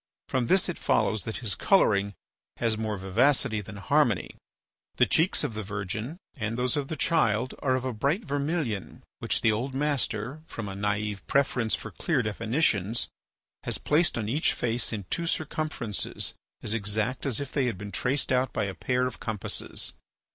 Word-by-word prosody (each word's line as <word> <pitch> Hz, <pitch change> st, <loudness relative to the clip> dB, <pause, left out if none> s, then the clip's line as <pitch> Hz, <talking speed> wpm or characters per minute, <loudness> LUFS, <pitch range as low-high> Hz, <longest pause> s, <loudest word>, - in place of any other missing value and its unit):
From 125 Hz, -2 st, +1 dB
this 190 Hz, +5 st, +4 dB
it 175 Hz, -, -4 dB
follows 110 Hz, -4 st, +2 dB
that 110 Hz, -, -3 dB
his 100 Hz, -, +3 dB
colouring 100 Hz, -, +3 dB, 0.4 s
has 115 Hz, -2 st, +2 dB
more 110 Hz, -1 st, -2 dB
vivacity 110 Hz, +3 st, +2 dB
than 105 Hz, +1 st, -9 dB
harmony. 125 Hz, -, +2 dB, 0.6 s
The -, -, +5 dB
cheeks 165 Hz, +4 st, +2 dB
of -, -, -1 dB
the 110 Hz, -, -3 dB
Virgin 105 Hz, -, -4 dB, 0.2 s
and 115 Hz, -3 st, -3 dB
those 125 Hz, +3 st, +1 dB
of 145 Hz, -2 st, -1 dB
the 160 Hz, -, -3 dB
Child 130 Hz, -7 st, +2 dB
are 130 Hz, -2 st, +2 dB
of 130 Hz, 0 st, -2 dB
a 130 Hz, -, -1 dB
bright 145 Hz, -, 0 dB
vermilion 145 Hz, -, -2 dB, 0.2 s
which -, -, 0 dB
the 115 Hz, -, +4 dB
old 125 Hz, +5 st, -2 dB
master, 135 Hz, -2 st, -1 dB
from 110 Hz, -3 st, -5 dB
a 100 Hz, -, -4 dB
naïve 105 Hz, 0 st, -1 dB
preference 125 Hz, -5 st, +2 dB
for -, -, -8 dB
clear 145 Hz, -7 st, 0 dB
definitions, 110 Hz, -, +1 dB, 0.5 s
has -, -, -1 dB
placed 155 Hz, -1 st, +2 dB
on 110 Hz, -3 st, -2 dB
each 145 Hz, +9 st, +2 dB
face 120 Hz, 0 st, -1 dB
in 105 Hz, -4 st, -4 dB
two 170 Hz, -1 st, 0 dB
circumferences 155 Hz, -, -1 dB, 0.3 s
as 105 Hz, -, +3 dB
exact 110 Hz, +5 st, -1 dB
as 130 Hz, -, +1 dB
if 140 Hz, -2 st, -5 dB
they 135 Hz, -3 st, +1 dB
had 115 Hz, -6 st, -2 dB
been 100 Hz, +2 st, -7 dB
traced 130 Hz, +5 st, 0 dB
out 130 Hz, 0 st, +2 dB
by -, -, 0 dB
a 100 Hz, -2 st, -2 dB
pair 125 Hz, +5 st, 0 dB
of 125 Hz, -, -4 dB
compasses. 110 Hz, -4 st, -2 dB
120 Hz, 175 wpm, -28 LUFS, 105-140 Hz, 0.6 s, The